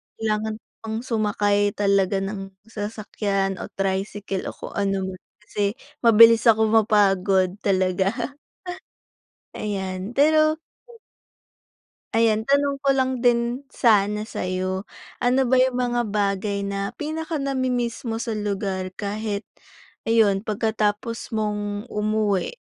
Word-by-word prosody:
Kailangan 215 0 -1
ko - - -68 0.2
pang 220 0 -3
sumakay 205 -3 +1
talaga 195 -1 +2
ng 195 -1 -6
sasakyan 205 -3 -2
o - - -5
tricycle 195 0 -2
o - - -6
kung - - -8
anuman 190 -2 -1 0.2
kasi 205 0 -1 0.2
mabilis 230 0 +7
akong 220 -1 +5
mapagod 195 -3 +3
talaga. 190 0 +1 1.4
Ayan, 190 0 -4
pero 310 +2 +4 1.5
Ayan, 220 -1 +3
tanong 280 +1 +2
ko 275 0 +2
lang 260 -2 0
din 240 +2 +2
sana 210 -3 +3
sa'yo. 185 -1 -3 0.3
Ano 250 +1 +2
ba 260 - +4
yung 255 0 +4
mga 240 -1 0
bagay 200 0 0
na 200 0 -3
pinaka 315 0 -4
nami-miss 255 -3 -1
mo 225 0 -2
sa 225 -2 -3
lugar 195 -2 -3
kahit 205 +1 -3 0.6
ayun, 220 -3 +3
pagkatapos 215 +1 -1
mong 210 0 -2
umuwi? 210 - 0
210 Hz, 110 wpm, -23 LUFS, 195-230 Hz, 1.5 s, mabilis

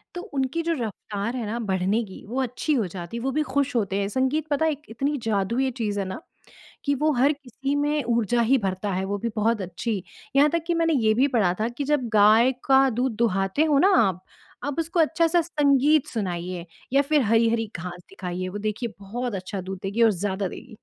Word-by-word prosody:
तो 355 - -4
उनकी 285 - -2
जो 335 0 0
रफ्तार 215 +1 -4
है 235 -3 -3
ना 230 +3 -3
बढ़ने 190 +5 +1
की 190 -3 -11
वो 260 +2 -1
अच्छी 255 +5 -1
हो 225 -8 +1
जाती 175 +5 -7
है, - - -4
वो 270 - 0
भी 305 - 0
खुश 280 -1 +1
होते 200 -3 0
हैं। 200 - 0
संगीत 265 +6 0
पता 290 +2 +1
है 315 - +3
एक 290 0 -6
इतनी 280 +6 -1
जादुई 225 +4 0
ये 260 - 0
चीज़ 210 -3 -1
है 195 - -1
ना, 190 +10 -6 0.6
कि 285 0 +2
वो 305 +3 +2
हर 275 +5 +4
किसी 275 0 -4
में 295 0 +1
ऊर्जा 235 0 +1
ही 260 +4 +4
भरता 195 -1 -2
है 185 +1 -1
वो 200 +1 -2
भी 230 +3 -2
बहुत 220 0 +1
अच्छी। 190 +2 -3 0.3
यहाँ 290 +2 +6
तक 335 +1 -1
कि 345 - +2
मैंने 330 -1 +2
ये 220 -6 +3
भी 260 +5 +3
पढ़ा 215 -10 +2
था 220 - +1
कि 285 - -1
जब 280 -4 0
गाय 215 +4 +6
का 270 0 +5
दूध 245 0 -1
दुहाते 195 +4 +1
हो 300 -3 +3
ना 380 - +5 0.2
आप, 185 0 -4 0.4
आप 285 +3 -3
उसको 335 +2 -1
अच्छा-सा 330 +1 +3
संगीत 295 -2 +3
सुनाइए 180 -5 -4 0.3
या 275 - +6
फिर 295 +1 +2
हरी-हरी 225 0 +2
घास 175 +1 -7
दिखाइए 185 -1 -5
वो 205 - -5
देखिए 215 +3 -3
बहुत 225 +3 -4
अच्छा 190 +1 -5
दूध 190 0 -6
देगी 200 +4 -1
और 225 - +6
ज़्यादा 195 0 -2
देगी। 240 +5 -10
235 Hz, 220 wpm, -25 LUFS, 200-280 Hz, 0.6 s, यहाँ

